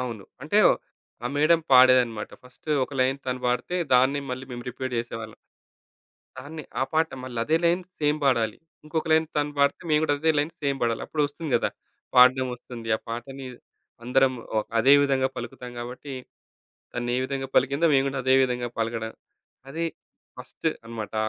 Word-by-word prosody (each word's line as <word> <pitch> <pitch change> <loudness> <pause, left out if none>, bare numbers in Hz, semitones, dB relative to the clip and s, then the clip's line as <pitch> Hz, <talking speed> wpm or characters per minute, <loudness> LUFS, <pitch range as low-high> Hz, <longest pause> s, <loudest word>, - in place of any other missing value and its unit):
అవును. 115 -6 -5 0.2
అంటే, - - +2 0.7
ఆ - - +1
మేడమ్ 160 +2 +4
పాడేదన్నమాట. 125 -4 +5
ఫస్టు 125 +4 -10
ఒక 145 - -15
లైన్ 130 +2 +2
తను 125 0 -2
పాడితే, 125 +8 0 0.2
దాన్నే 130 +3 +4
మళ్ళీ 130 +1 -4
మేము 120 0 -6
రిపీట్ 130 0 -4
జేసేవాళ్ళం. 115 -2 -5 1.0
దాన్నె, 150 +3 -8 0.2
ఆ - - +4
పాట 160 +1 +3 0.2
మళ్ళా 125 -3 -5
అదే 160 +1 +3
లైన్ 175 +2 +2 0.2
సేమ్ 150 0 +2
బాడాలి. 115 -5 +2 0.3
ఇంకొక 160 +1 -2
లైన్ 160 0 +4
తను 145 0 0
పాడితే 140 +4 +2
మేము 150 0 +4
కూడా 145 - +2
అదే 160 +1 +3
లైన్ 150 +3 +1
సేమ్ 140 -1 0
బాడాలి. 115 -1 0
అప్పుడొస్తుంది 150 0 -2
గదా. - - +1 0.5
పాడ్డం 130 +1 +6
ఒస్తుంది. 115 -2 -9
ఆ - - -22
పాటని 130 +3 -6 0.6
అందరం 130 +2 +3 0.2
ఒ - - +5 0.2
అదే 135 +5 +6
విధంగా 135 -2 +2
పలుకుతాం 120 +1 -7
గాబట్టి 125 +4 -7 0.8
తనే 120 0 -1
విధంగా 135 0 -3
పలికిందో 140 +5 +3
మేము 135 0 +4
గూడా 135 0 -3
అదే 130 +1 +3
విధంగా 125 -1 -1
పలకడం. 115 0 -2 0.6
అది 165 +4 -2 0.5
ఫస్టు - - -3 0.2
అనమాట. 115 -2 -6
130 Hz, 160 wpm, -25 LUFS, 120-145 Hz, 1.0 s, పాడ్డం